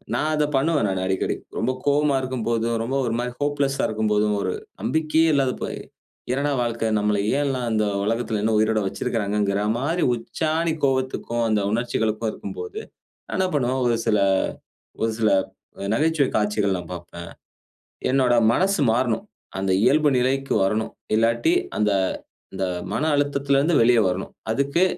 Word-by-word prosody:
நான் 155 +1 0
அத 150 - +2
பண்ணுவேன் 150 -4 +2
நானு 95 -1 -1
அடிக்கடி. 95 0 0 0.2
ரொம்ப 130 - +1 0.2
கோவமா 145 0 +3
இருக்கும்போதும், 115 -2 -1
ரொம்ப 130 +4 -2
ஒரு 115 - -1
மாரி 125 0 -3
ஹோப்லெஸ்ஸா 145 -1 0
இருக்கும்போதும், 105 -1 +1
ஒரு 95 -1 -1 0.3
நம்பிக்கையே 160 +1 +2
இல்லாத 135 -2 +2
போய் - - -4 0.5
என்னாட 140 +2 0
வாழ்க்க? 115 -1 -1
நம்மள 105 0 +1 0.2
ஏன் 145 - +1
எல்லாம் 130 -3 -2
இந்த 110 -1 +2 0.2
உலகத்துல 115 0 -1
இன்னும் 110 0 +2
உயிரோட 110 0 +2
வைச்சிருக்குறாங்கங்குற 100 0 -1 0.2
மாரி, 165 +7 -1
உச்சாணி 160 +7 -1
கோவத்துக்கும், 130 -3 0
அந்த 105 -1 +2
உணர்ச்சிகளுக்கும் 110 -1 -1
இருக்கும்போது, 435 0 -7 0.5
நான் - - -4
என்ன 190 - +2
பண்ணுவேன் 130 -2 0
ஒரு 120 -1 +2
சில, 105 - +3 0.8
ஒரு 115 0 +1
சில 110 -1 +3 0.5
அ - - -3
நகைச்சுவை 150 +1 +2
காட்சிகள்லாம் 100 -4 0
பாப்பேன். 85 -1 -9 0.8
என்னோட 130 -2 +3 0.2
மனசு 190 0 +1
மாறனும். 115 -1 0 0.3
அந்த 95 0 0
இயல்பு 150 +4 +4
நிலைக்கு 135 +2 0
வரணும். 110 +3 0 0.2
இல்லாட்டி 115 - +2 0.2
அந்த, 105 -1 +2 0.6
அந்த 95 0 -1 0.3
மன 150 - -1
அழுத்தத்துல 140 -1 +1
இருந்து 155 +4 +2
வெளிய 120 0 +5
வரணும். 90 +1 -3 0.2
அதுக்கு 140 +9 +1
120 Hz, 145 wpm, -23 LUFS, 110-140 Hz, 0.8 s, வெளிய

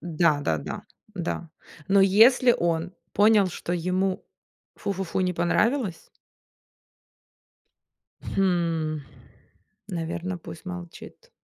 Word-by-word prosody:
Да-да-да. 155 - 0 0.3
Да. 170 -2 -4 0.4
Но 195 0 +5
если 230 +6 +6
он 170 +1 -1 0.2
понял, 210 -1 +5
что 175 - -5
ему, 185 +2 -1 0.5
фу-фу-фу, 195 -2 -3
не 180 -1 +1
понравилось 185 +4 0 2.1
Хм, 170 -5 0 0.9
наверно, 175 0 -3
пусть 160 -1 -11
молчит. 180 - -9
180 Hz, 80 wpm, -25 LUFS, 170-195 Hz, 2.1 s, если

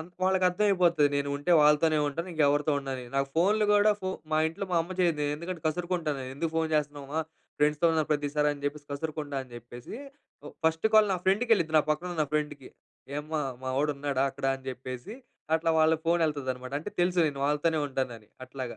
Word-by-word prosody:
అం 160 - -8 0.2
వాళ్ళకి 190 0 +2
అర్థం 180 +4 0
అయిపోద్ది 170 -6 +4
నేను 140 0 -1
ఉంటే 145 +5 0
వాళ్ళతోనే 150 +1 +4
ఉంటాను. 165 +6 -4
ఇంక 160 - -5
ఎవరితో 145 +1 +2
ఉండనని. 135 -2 -5
నాకు 135 0 +1
ఫోన్‌లు 205 +6 +3
కూడా 205 +1 +5
ఫో 185 - -2 0.2
మా 155 - +3
ఇంట్లో 165 +5 -5
మా - - +3
అమ్మ 175 +3 -7
చెయ్యదు. 165 -4 +2
ఎందుకంటే 170 +2 -6
కసురుకుంటాను. 165 -2 -1
నేను 130 0 -6
ఎందుకు 160 +2 -2
ఫోన్ 160 -1 +1
చేస్తున్నావు 145 -2 -3
మా 160 - +2 0.4
ఫ్రెండ్స్‌తో 150 +3 +3
ఉన్నాను 155 -1 0
ప్రతిసారి 150 0 +1
అని 140 - -13
చెప్పేసి 145 0 -5
కసురుకుంటా 150 -1 -4
అని 125 - -19
చెప్పేసి. 120 - -10 0.7
ఫస్ట్ 160 +4 +2
కాల్ 215 -1 +7
నా 180 - -2
ఫ్రెండ్‌కి 210 +6 +2
వెళ్ళిద్ది. 160 -7 +2
నా - - +4
పక్కన 155 +4 -1
ఉన్న 155 -1 +1
ఫ్రెండ్‌కి. 150 -3 -3 0.5
ఏమ్మా 155 +1 -3 0.2
మా 130 - -4
వాడు 150 +1 +2
ఉన్నాడా 140 -1 -1
అక్కడ? 140 0 -9
అని 130 - -18
చెప్పేసి 130 - -7 0.4
అట్లా 165 0 0
వాళ్ళ 160 +1 +5
ఫోన్ 170 +1 +3
వెళ్తుంది 145 -4 -2
అనమాట. 130 +1 -10
అంటే 205 - -6
తెలుసు 180 0 +1
నేను 140 -2 -6
వాళ్ళతోనే 150 +2 +1
ఉంటానని. 125 -5 -4 0.2
అట్లాగా. 130 -2 -6
150 Hz, 200 wpm, -28 LUFS, 140-170 Hz, 0.7 s, కాల్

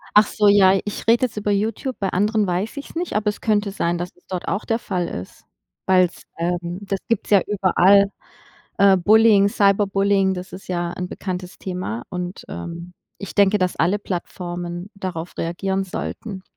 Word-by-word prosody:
Ach 210 0 +7
so, 210 -2 +3
ja, 195 -1 +6
ich 205 - -6
rede 235 +2 +5
jetzt 225 -3 -7
über 205 0 -1
YouTube, 220 +5 -1
bei 195 -2 0
anderen 210 +3 +1
weiß 185 +6 -2
ich 280 - -7
es - - -15
nicht, 350 +1 -3
aber 210 0 0
es 210 - -5
könnte 210 -2 +1
sein, 175 -3 -1
dass 175 +1 -4
es 180 - -28
dort 185 -2 -4
auch 200 - -2
der 225 - +1
Fall 180 -6 -2
ist. 90 +2 -8 0.4
Weil 185 -1 +5
es, 175 - -16
ähm 175 +1 -2
das 195 -1 -3
gibt 230 -3 0
es - - -12
ja 200 -2 +6
überall, 200 0 +4 0.7
äh, 195 -1 +6
Bullying, 205 +2 +5
Cyberbullying, 200 -1 +2
das 185 0 -7
ist 190 - -10
ja 175 -1 -2
'n 180 0 -4
bekanntes 180 -1 -6
Thema 180 - -4
und, 180 0 -5
ähm, 170 +1 -7 0.2
ich 200 - -8
denke, 200 0 +4
dass 185 -1 0
alle 185 +5 +2
Plattformen 175 -1 -5
darauf 180 -4 -6
reagieren 190 +3 -2
sollten. 190 +1 -6
195 Hz, 190 wpm, -22 LUFS, 180-205 Hz, 0.7 s, Ach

